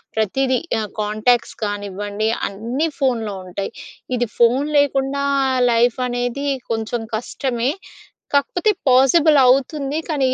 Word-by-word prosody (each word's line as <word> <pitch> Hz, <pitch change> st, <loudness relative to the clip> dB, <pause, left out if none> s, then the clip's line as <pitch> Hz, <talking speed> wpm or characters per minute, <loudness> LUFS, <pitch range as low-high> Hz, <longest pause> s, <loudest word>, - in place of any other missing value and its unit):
ప్రతీదీ, 255 Hz, +5 st, +1 dB, 0.2 s
ఆహ్, 215 Hz, -1 st, -4 dB
కాంటాక్ట్స్ 215 Hz, +3 st, +1 dB
కానివ్వండి 205 Hz, +1 st, -3 dB, 0.2 s
అన్నీ 235 Hz, +10 st, -2 dB
ఫోన్‌లో 230 Hz, -7 st, 0 dB
ఉంటాయి. 190 Hz, +2 st, -5 dB, 0.5 s
ఇది 240 Hz, 0 st, 0 dB
ఫోన్ 245 Hz, +5 st, +4 dB
లేకుండా 280 Hz, 0 st, 0 dB, 0.5 s
లైఫ్ 240 Hz, +2 st, +2 dB
అనేది 245 Hz, +3 st, -2 dB, 0.3 s
కొంచెం 225 Hz, +1 st, -3 dB
కష్టమే. 245 Hz, +2 st, -2 dB, 0.6 s
కాకపోతే 355 Hz, +8 st, +2 dB, 0.2 s
పాసిబుల్ 280 Hz, +4 st, +5 dB
అవుతుంది. 275 Hz, +3 st, +2 dB
కానీ 295 Hz, -5 st, 0 dB
245 Hz, 105 wpm, -20 LUFS, 220-275 Hz, 0.6 s, పాసిబుల్